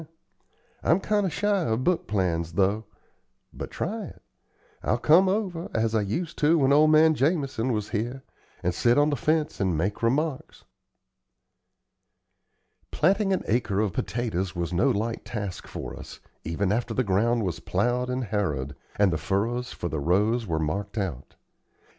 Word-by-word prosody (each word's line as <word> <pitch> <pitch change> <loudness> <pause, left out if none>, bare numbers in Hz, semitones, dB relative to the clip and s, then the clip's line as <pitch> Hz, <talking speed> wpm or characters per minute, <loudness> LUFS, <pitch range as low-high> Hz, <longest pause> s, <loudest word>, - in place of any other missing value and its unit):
I'm 170 - +3
kind 205 0 +1
o' - - 0
shy 205 +4 +1
of 115 +3 0
book 180 +1 +1
plans, 85 -5 -1
though. 100 +4 +1 0.7
But - - -6
try 215 +3 -3
it. - - -13 0.6
I'll 110 - +1
come 170 +9 +5
over, 185 -4 -2
as 110 0 +1
I 110 - +2
used 130 - -3
to 155 +3 +4
when 140 -2 +4
old 155 +2 +6
man 155 +1 +6
Jamison 140 -5 0
was 105 -3 -2
here, 120 +5 -3 0.4
and 90 - +1
sit 120 +7 +3
on 145 +1 +4
the - - +1
fence 155 +4 0
and 95 -5 +1
make 95 +6 -1
remarks." 135 +5 -1 2.3
Planting 195 +5 +2
an 190 - 0
acre 105 -4 0
of 105 -4 0
potatoes 95 -6 -2
was 85 0 -3
no 105 +11 +3
light 115 -1 -1
task 100 -6 -5
for - - -6
us, - - -10 0.2
even 95 +5 -1
after 115 +1 -1
the 130 - +2
ground 110 +3 +1
was 90 -3 -3
plowed 120 +6 0
and 125 +1 -1
harrowed, 75 - -2 0.2
and 100 -4 +3
the 80 - -1
furrows 115 +9 -1
for 85 - -4
the 80 -2 -3
rows 105 +9 +1
were 80 -2 -1
marked 100 +8 -3
out. 85 - -4
115 Hz, 165 wpm, -26 LUFS, 95-150 Hz, 2.3 s, old